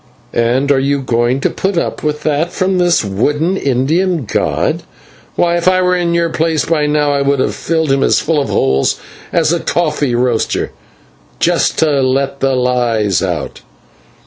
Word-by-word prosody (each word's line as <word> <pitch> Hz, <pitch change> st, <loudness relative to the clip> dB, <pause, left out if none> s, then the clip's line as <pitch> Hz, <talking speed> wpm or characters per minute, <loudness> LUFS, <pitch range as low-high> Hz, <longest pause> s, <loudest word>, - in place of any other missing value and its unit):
"And 125 Hz, +4 st, +1 dB
are 135 Hz, -, +3 dB
you 140 Hz, +1 st, 0 dB
going 120 Hz, +2 st, 0 dB
to -, -, +1 dB
put 190 Hz, -1 st, -2 dB
up -, -, -2 dB
with 150 Hz, 0 st, -2 dB
that 155 Hz, +3 st, 0 dB
from 185 Hz, 0 st, 0 dB
this 175 Hz, -9 st, +2 dB
wooden 145 Hz, -, 0 dB
Indian 155 Hz, +3 st, 0 dB
god? -, -, -1 dB, 0.5 s
Why, 170 Hz, 0 st, +2 dB
if 170 Hz, -, -2 dB
I 185 Hz, 0 st, +3 dB
were 180 Hz, 0 st, +2 dB
in 170 Hz, -1 st, 0 dB
your 170 Hz, 0 st, +1 dB
place, 160 Hz, -1 st, 0 dB
by 155 Hz, -3 st, +1 dB
now 150 Hz, -1 st, +1 dB
I 140 Hz, -, 0 dB
would 140 Hz, 0 st, +1 dB
have -, -, 0 dB
filled 160 Hz, -3 st, -1 dB
him 135 Hz, 0 st, +2 dB
as -, -, +3 dB
full 155 Hz, -2 st, 0 dB
of 140 Hz, -, -3 dB
holes 65 Hz, 0 st, +1 dB, 0.3 s
as 165 Hz, -1 st, +2 dB
a 170 Hz, -, 0 dB
coffee 150 Hz, -7 st, 0 dB
roaster, 120 Hz, -2 st, 0 dB, 0.7 s
just -, -, +1 dB
to 150 Hz, -4 st, +2 dB
let 135 Hz, +1 st, 0 dB
the 135 Hz, -1 st, +1 dB
lies 120 Hz, -6 st, +1 dB
out." -, -, -3 dB
145 Hz, 175 wpm, -15 LUFS, 130-170 Hz, 0.7 s, are